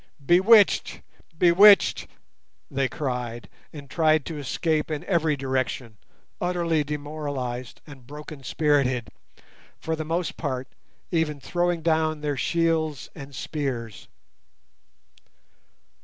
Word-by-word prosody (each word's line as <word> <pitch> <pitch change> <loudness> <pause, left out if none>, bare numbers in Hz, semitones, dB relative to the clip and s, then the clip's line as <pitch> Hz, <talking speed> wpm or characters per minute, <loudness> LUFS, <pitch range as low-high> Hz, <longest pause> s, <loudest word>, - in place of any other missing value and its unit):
"Bewitched, 195 +6 +5 0.4
bewitched!" 190 +4 +6 0.6
they 135 -1 0
cried, 125 -3 -4 0.2
and 145 -2 -10
tried 155 0 +2
to 160 -3 -5
escape 155 +3 -1
in 155 -2 -3
every 160 -5 +1
direction, 130 -4 -3 0.4
utterly 170 -3 0
demoralized 145 -4 -5
and 135 -5 -14
broken 150 0 -9
spirited, 135 -5 +1 0.7
for 160 - -2
the 160 - -4
most 165 +2 -2
part 130 -4 -3 0.4
even 160 -4 0
throwing 175 +2 -1
down 160 -2 +1
their 145 -1 -1
shields 160 -1 0
and 140 -3 -10
spears. 125 -9 -4
150 Hz, 100 wpm, -25 LUFS, 135-165 Hz, 0.7 s, bewitched